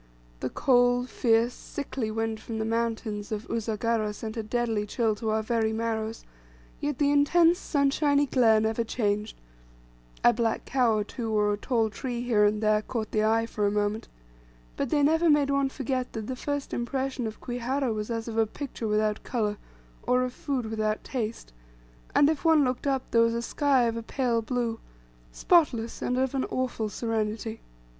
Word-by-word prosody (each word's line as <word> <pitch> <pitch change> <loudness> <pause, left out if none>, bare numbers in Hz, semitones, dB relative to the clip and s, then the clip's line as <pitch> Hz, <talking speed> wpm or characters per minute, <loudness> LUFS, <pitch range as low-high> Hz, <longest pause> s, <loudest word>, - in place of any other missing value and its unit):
The - - -2
cold, 245 - +3
fierce, 230 0 +2
sickly 265 -5 -5
wind 225 0 -2
from 225 0 -6
the 220 - -1
mountains 225 -2 -2
of 215 0 -4
Usagara 225 -1 -1
sent 220 0 -6
a 225 - -2
deadly 220 -1 -1
chill 225 0 +1
to 220 0 -3
our 220 0 +1
very 220 0 +1
marrows, 225 0 -3 0.5
yet 290 -2 -2
the 285 -1 +2
intense 330 +4 +4
sunshiny 285 0 +2
glare 230 -5 +4
never 220 +1 0
changed, 210 -2 -1 0.9
a 240 - +6
black 230 -1 -1
cow 245 -4 +2
or 210 - 0
two, 225 +1 -5
or 210 -1 +2
a - - -2
tall 225 0 0
tree 240 +3 -4
here 220 -4 +3
and 210 +1 +1
there, 215 0 +3
caught 220 -1 -4
the 215 - +1
eye 225 +1 +2
for 210 -2 -1
a - - +1
moment, 210 +1 -1 0.7
but - - -2
they 290 +1 +2
never 320 +3 +4
made 290 -2 +4
one 275 -1 +2
forget 260 -2 -3
that 220 -2 -4
the 260 - -4
first 285 +2 -4
impression 260 0 -2
of 220 - -7
Kwihara 245 +1 -2
was 210 0 -4
as 230 -1 -3
of 225 -1 -2
a 220 - +3
picture 240 -2 -5
without 215 0 +1
colour, 210 -4 -2 0.4
or 250 0 +2
of 250 -1 -3
food 265 -4 -3
without 215 -1 -1
taste; 225 - -4 0.6
and 285 - +6
if 310 -1 0
one 320 -3 +5
looked 255 +2 -2
up, 270 -2 -1
there 230 - +5
was 230 0 +3
a 235 - -1
sky 275 0 +2
of 230 -1 0
a 230 - -3
pale 235 0 0
blue, 235 -1 -2 0.5
spotless, 240 - +2
and 250 - 0
of 265 0 0
an 265 -1 0
awful 245 -4 -2
serenity. 220 0 -3
230 Hz, 185 wpm, -27 LUFS, 220-260 Hz, 0.9 s, a